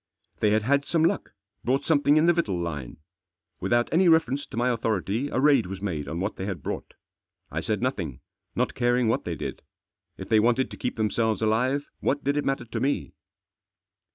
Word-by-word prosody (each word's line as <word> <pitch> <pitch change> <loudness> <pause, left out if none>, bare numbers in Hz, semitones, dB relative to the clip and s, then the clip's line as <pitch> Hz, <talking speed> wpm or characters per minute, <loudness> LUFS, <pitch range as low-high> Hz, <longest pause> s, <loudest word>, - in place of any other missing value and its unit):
They 105 - +3
had 105 +1 +2
had 140 +4 +2
some 160 +2 +1
luck, 190 +4 0 0.3
brought 130 +3 +1
something 145 -1 +4
in 155 - +4
the 175 - +5
victual 135 - 0
line. 75 -7 -5 0.6
Without 120 +6 +2
any 180 +3 +4
reference 160 -4 +3
to - - -9
my 120 +1 +2
authority 115 +1 -1
a - - -1
raid 140 -6 +4
was 95 +1 -6
made 85 -8 -3
on 80 +4 -4
what 100 +4 -2
they 95 - -4
had 90 -9 -5
brought - - -5 0.6
I - - -2
said - - -2
nothing, - - -2 0.3
not - - 0
caring 120 -1 +2
what - - 0
they - - -2
did. - - -5 0.6
If - - -7
they 110 -1 +4
wanted 120 +4 +2
to - - -8
keep 125 - -3
theni 110 -2 0
selves 110 -2 +1
alive, 125 +6 +1
what 145 +1 0
did 140 +1 +1
it 145 - 0
matter 135 -3 -1
to 115 - -4
me 140 +2 -1
120 Hz, 205 wpm, -26 LUFS, 105-140 Hz, 0.6 s, the